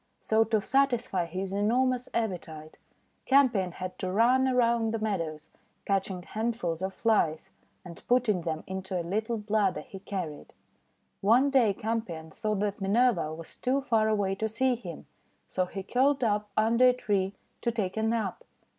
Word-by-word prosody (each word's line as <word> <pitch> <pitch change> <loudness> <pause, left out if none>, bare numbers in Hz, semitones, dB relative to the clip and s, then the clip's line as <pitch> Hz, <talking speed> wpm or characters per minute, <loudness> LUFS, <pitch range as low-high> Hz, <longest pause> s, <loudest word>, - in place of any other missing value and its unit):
So, 220 0 +3
to 220 0 +1
satisfy 240 -7 +1
his 185 +3 -4
enormous 245 +5 +1
appetite, 165 -8 -4 0.5
Campion 240 -10 +3
had 185 0 -6
to 185 - -2
run 250 +6 +4
around 235 -3 +2
the - - 0
meadows, 165 -8 -3 0.3
catching 195 -2 -1
hand 225 +5 -2
fuls 170 -5 -3
of 190 0 -2
Flies, 190 -9 +1 0.3
and 170 -2 -10
putting 240 -7 +2
them 160 -2 -3
into 190 -1 -4
a 170 - -4
little 220 +6 -1
bladder 210 -2 0
he 195 - -10
carried. 185 -7 -6 0.7
One 245 +7 +4
day 250 -6 +4
Campion 190 -9 -4
thought 215 +2 -2
that 205 -1 -2
Minerva 215 -4 +2
was 160 +1 -8
too 265 +2 0
far 225 -5 +2
away 200 -3 +1
to 220 +3 -2
see 255 +4 +1
him, 185 -9 -7 0.4
so 185 -1 -1
he 195 +1 -6
curled 265 +5 +2
up 210 -2 0
under 230 +4 +5
a - - +3
tree 200 -5 -1 0.3
to 235 - 0
take 210 -5 -2
a 220 - -1
nap. 220 -4 -1
210 Hz, 165 wpm, -28 LUFS, 185-235 Hz, 0.7 s, under